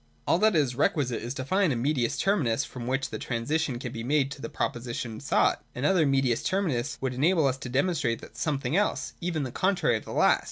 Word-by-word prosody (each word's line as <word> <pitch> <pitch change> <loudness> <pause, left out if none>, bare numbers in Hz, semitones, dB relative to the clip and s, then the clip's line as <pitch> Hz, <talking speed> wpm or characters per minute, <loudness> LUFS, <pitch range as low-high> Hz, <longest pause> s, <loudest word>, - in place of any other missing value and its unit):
All 165 - +3
that 215 -1 +4
is 140 -5 +2
requisite 125 -2 0
is 120 +4 -5
to 130 - -4
find 190 +3 +2
a - - 0
medins 120 -1 0
terminus 150 - +1
from 120 -2 -7
which 135 +1 -1
the - - -4
transition 130 +3 -1
can 125 -1 -5
be 115 -1 -5
made 140 +1 +1
to 140 - -8
the - - -5
proposition 120 -2 -3
sought. - - +2
An 125 - -2
other 170 -3 +4
niedius 135 -4 +1
terminus 155 -10 -1
would 130 -1 -1
enable 155 +5 +3
us 135 -1 +1
to 130 - -7
demonstrate 130 -4 0
something 145 -3 -1
else, 205 +2 0
and - - -7
even 160 -4 -1
the 130 - -4
contrary 175 - +1
of - - -10
the - - -8
last. - - +4
135 Hz, 225 wpm, -27 LUFS, 120-160 Hz, -, that